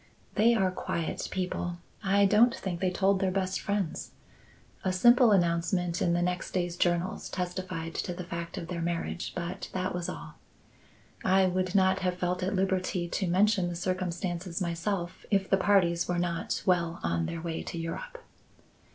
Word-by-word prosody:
"They 235 +3 +4
are 190 -4 +2
quiet 170 -2 -3
people. 180 -2 -2 0.3
I 200 +1 +4
don't 220 +4 +5
think 180 -3 -4
they 185 0 +1
told 190 +1 +2
their 190 -1 +1
best 185 0 -1
friends. 200 -5 -2 0.7
A 185 - +1
simple 240 +5 +6
announcement 175 -1 +1
in 170 - +2
the 175 0 +1
next 180 +1 -2
day's 175 -2 -1
journals 175 +1 0
testified 180 -2 -4
to - - -3
the 180 - -5
fact 170 -1 -5
of 165 - -5
their 175 -1 -4
marriage, 165 - -2
but 175 0 -4
that 185 0 -1
was 175 -1 -3
all. - - -8 0.8
I 190 0 +4
would 185 0 0
not 190 -1 +4
have 180 -1 -1
felt 180 0 -1
at 190 +2 -1
liberty 185 -2 0
to 190 +2 -1
mention 190 0 +3
the 175 - -4
circumstances 180 0 -2
myself, 175 +1 -2
if 195 -2 +2
the 195 - +3
parties 180 -4 +3
were 175 - 0
not 170 -1 -1
well 170 -3 +1
on 85 0 0
their 170 - -4
way 165 -1 -3
to - - -6
Europe." 485 - -5
180 Hz, 170 wpm, -29 LUFS, 170-190 Hz, 0.8 s, simple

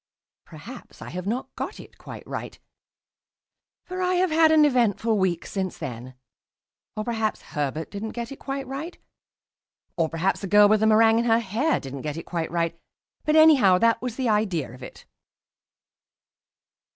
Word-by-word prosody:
Perhaps - - -12
I - - -9
have 180 +3 -6
not 240 +5 -3
got - - -5
it - - -14
quite - - -10
right, - - -6 1.3
for 370 0 -6
I 365 0 +1
have 360 -1 +1
had 320 0 +5
an 310 -1 +6
eventful 230 -4 +2
week 185 -4 0
since 190 -2 -4
then; 125 -4 -7 0.8
or 215 - -1
perhaps 220 -2 -2
Herbert 150 +2 -3
didn't 215 +2 -5
get 235 0 -5
it 275 - -9
quite 275 0 -4
right; 275 +6 -6 1.0
or 165 -2 +1
perhaps 165 +4 -1
the 195 - -4
girl 205 +2 +6
with 215 +1 +3
the 220 - +2
meringue 225 +1 +5
in 235 - 0
her 225 -1 +4
hair 235 +8 0
didn't 135 0 -7
get 150 0 -4
it 165 - -7
quite 170 -2 -3
right; 170 0 -2 0.5
but 305 0 +2
anyhow, 285 -13 +6
that 230 +3 +2
was 250 -2 -4
the 260 -1 -2
idea 195 - 0
of 125 - -14
it. 125 - -11
215 Hz, 170 wpm, -24 LUFS, 170-255 Hz, 1.3 s, an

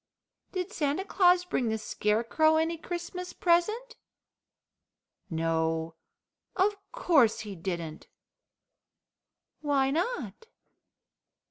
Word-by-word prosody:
"Did 370 +2 -4
Santa 300 +5 -1
Claus 360 -2 +4
bring 250 -9 0
the 220 - 0
Scarecrow 230 +9 +1
any 325 +1 +1
Christmas 350 +2 -6
present?" 425 +8 +1 1.3
"No, 160 0 -1 0.6
of 405 +2 +2 0.2
course 320 - +3
he 210 -2 -7
didn't." 170 -3 -5 1.5
"Why 275 -3 +1
not?" 460 - -3
315 Hz, 85 wpm, -29 LUFS, -, 1.5 s, Claus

